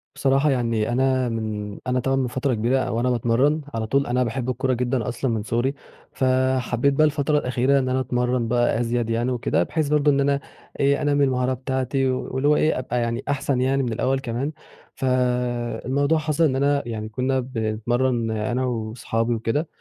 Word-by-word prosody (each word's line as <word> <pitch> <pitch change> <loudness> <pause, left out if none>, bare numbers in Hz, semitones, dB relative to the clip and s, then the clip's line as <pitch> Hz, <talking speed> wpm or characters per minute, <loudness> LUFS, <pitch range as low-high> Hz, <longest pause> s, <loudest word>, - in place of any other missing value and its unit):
بصراحة 135 +2 +2
يعني 115 -4 0
أنا 130 0 +1
من 105 -2 -4
أنا 125 0 +1
تمام 135 +2 0
من 130 - 0
فترة 130 +1 -1
كبيرة 120 +4 +1
أو 115 -2 -1
أنا 125 - +1
باتمرن 125 +6 +2
على 110 -1 -2
طول 140 +4 +1
أنا 125 +1 +1
باحب 125 +2 -3
الكورة 130 +1 0
جدًا 125 -1 -1
أصلًا 125 0 -2
من 110 -2 -1
صغري، 120 +5 0 0.4
فحبيت 130 0 +1
بقى 155 +3 +4
الفترة 150 0 +1
الأخيرة 130 0 +2
إن 130 -1 -1
أنا 130 +1 +1
أتمرّن 125 -1 0
بقى 120 -1 +1
أزيد 120 -1 -1
يعني 120 +2 0
وكده 85 -8 +1
بحيث 155 - -1
برضو 150 0 +3
إن 140 - +1
أنا 140 0 +2 0.4
إيه، 140 0 +2
أنمِّي 145 -1 +2
المهارة 130 -1 +1
بتاعتي 130 +1 -1
واللي 130 +2 -2
هو 150 - +5
إيه 155 -2 +2
أبقى 125 -1 -2
يعني 115 0 -2
أحسن 140 -2 0
يعني 135 +1 +1
من 120 -3 -2
الأوّل 130 +4 0
كمان، 135 +3 -3 0.4
فالموضوع 125 +3 0
حصل 155 +1 0
إن 140 -5 +3
أنا 140 +1 +2
يعني 110 -1 -4
كنّا 130 +4 0
بنتمرن 120 0 -1
أنا 120 +4 -1
وأصحابي 115 0 -2
وكده، 115 +8 -1
125 Hz, 180 wpm, -23 LUFS, 120-135 Hz, 0.4 s, هو